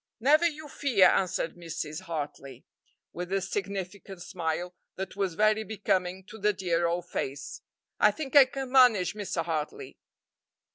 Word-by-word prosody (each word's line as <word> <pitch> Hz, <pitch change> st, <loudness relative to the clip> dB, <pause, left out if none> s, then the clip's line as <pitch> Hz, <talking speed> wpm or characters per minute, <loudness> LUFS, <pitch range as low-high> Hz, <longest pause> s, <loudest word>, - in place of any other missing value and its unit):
"Never 305 Hz, +8 st, +5 dB
you 310 Hz, -1 st, -6 dB
fear," 260 Hz, -9 st, +3 dB
answered 180 Hz, -3 st, 0 dB
Mrs. 165 Hz, -2 st, -5 dB
Hartley, 150 Hz, -6 st, -6 dB, 0.5 s
with 180 Hz, +1 st, -6 dB
a 195 Hz, -, +2 dB
significant 195 Hz, -1 st, -5 dB
smile 175 Hz, -1 st, -3 dB, 0.2 s
that 190 Hz, 0 st, -6 dB
was 195 Hz, -4 st, -1 dB
very 215 Hz, +2 st, +3 dB
becoming 190 Hz, -3 st, -1 dB
to 215 Hz, +3 st, -12 dB
the 210 Hz, +1 st, +2 dB
dear 175 Hz, -3 st, 0 dB
old 175 Hz, +1 st, -2 dB
face; 140 Hz, -1 st, -5 dB, 0.4 s
"I -, -, +6 dB
think 300 Hz, -3 st, -5 dB
I 280 Hz, -2 st, +10 dB
can 265 Hz, -1 st, -6 dB
manage 245 Hz, -9 st, +5 dB
Mr. 195 Hz, -5 st, -3 dB
Hartley." 155 Hz, -3 st, -4 dB
190 Hz, 145 wpm, -28 LUFS, 170-215 Hz, 0.5 s, I